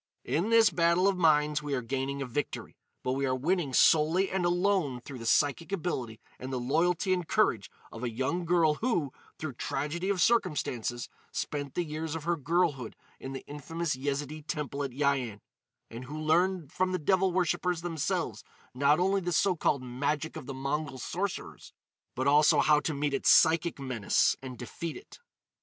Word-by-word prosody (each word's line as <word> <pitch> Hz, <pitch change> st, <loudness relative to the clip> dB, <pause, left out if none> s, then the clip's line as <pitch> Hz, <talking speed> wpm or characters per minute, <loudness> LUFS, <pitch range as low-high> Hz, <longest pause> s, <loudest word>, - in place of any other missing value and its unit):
"In 175 Hz, +8 st, 0 dB
this 225 Hz, -3 st, +6 dB
battle 170 Hz, +2 st, +3 dB
of 200 Hz, -, +2 dB
minds 150 Hz, -3 st, +3 dB
we 145 Hz, -1 st, -2 dB
are 125 Hz, -, -3 dB
gaining 135 Hz, +3 st, -2 dB
a -, -, -4 dB
victory. 130 Hz, +4 st, -4 dB, 0.3 s
But 130 Hz, -, -1 dB
we 135 Hz, +1 st, 0 dB
are 130 Hz, -, +1 dB
winning 155 Hz, +2 st, 0 dB
solely 160 Hz, +8 st, +4 dB
and 185 Hz, -2 st, 0 dB
alone 175 Hz, -7 st, +1 dB
through 130 Hz, +1 st, -9 dB
the 115 Hz, -, -5 dB
psychic 145 Hz, +8 st, +2 dB
ability 130 Hz, -, -3 dB, 0.2 s
and 130 Hz, +1 st, -6 dB
the 130 Hz, -, -2 dB
loyalty 165 Hz, +8 st, +1 dB
and 180 Hz, -3 st, -2 dB
courage 190 Hz, -, +1 dB, 0.2 s
of 115 Hz, -, -8 dB
a 120 Hz, -, 0 dB
young 130 Hz, +10 st, -2 dB
girl 170 Hz, -2 st, +3 dB
who, 175 Hz, -, 0 dB, 0.2 s
through 155 Hz, -4 st, -5 dB
tragedy 150 Hz, +9 st, -3 dB
of 200 Hz, -2 st, 0 dB
circumstances, 130 Hz, -, 0 dB, 0.2 s
spent 145 Hz, -2 st, -4 dB
the 175 Hz, -, +1 dB
years 155 Hz, 0 st, -4 dB
of 160 Hz, -, -5 dB
her 170 Hz, +2 st, +1 dB
girlhood 160 Hz, -5 st, 0 dB, 0.2 s
in 135 Hz, -, -7 dB
the 135 Hz, -, -7 dB
infamous 150 Hz, +2 st, -3 dB
Yezidee 145 Hz, +3 st, -3 dB
temple 145 Hz, -1 st, -4 dB
at 140 Hz, -, -2 dB
Yian, 130 Hz, -5 st, -1 dB, 0.5 s
and 120 Hz, +2 st, -7 dB
who 150 Hz, +4 st, -7 dB
learned 165 Hz, 0 st, +1 dB
from 185 Hz, 0 st, 0 dB
the -, -, +1 dB
devil 190 Hz, +3 st, +2 dB
worshipers 175 Hz, -1 st, 0 dB
themselves 160 Hz, -, -2 dB, 0.3 s
not 140 Hz, +4 st, +3 dB
only 195 Hz, +2 st, +2 dB
this 175 Hz, -2 st, 0 dB
so 195 Hz, -2 st, +2 dB
called 140 Hz, -4 st, 0 dB
magic 145 Hz, +5 st, -2 dB
of 155 Hz, -5 st, -8 dB
the 135 Hz, -, -4 dB
Mongol 140 Hz, +1 st, -3 dB
sorcerers, 180 Hz, +9 st, -5 dB, 0.4 s
but 130 Hz, -, -1 dB
also 150 Hz, +2 st, +5 dB
how 150 Hz, 0 st, +5 dB
to 150 Hz, +1 st, -3 dB
meet 145 Hz, 0 st, -1 dB
its 135 Hz, -, +2 dB
psychic 165 Hz, +1 st, +5 dB
menace 130 Hz, -7 st, +1 dB
and 130 Hz, -2 st, -8 dB
defeat 160 Hz, +7 st, -6 dB
it." 410 Hz, -, -14 dB
150 Hz, 180 wpm, -29 LUFS, 135-175 Hz, 0.5 s, this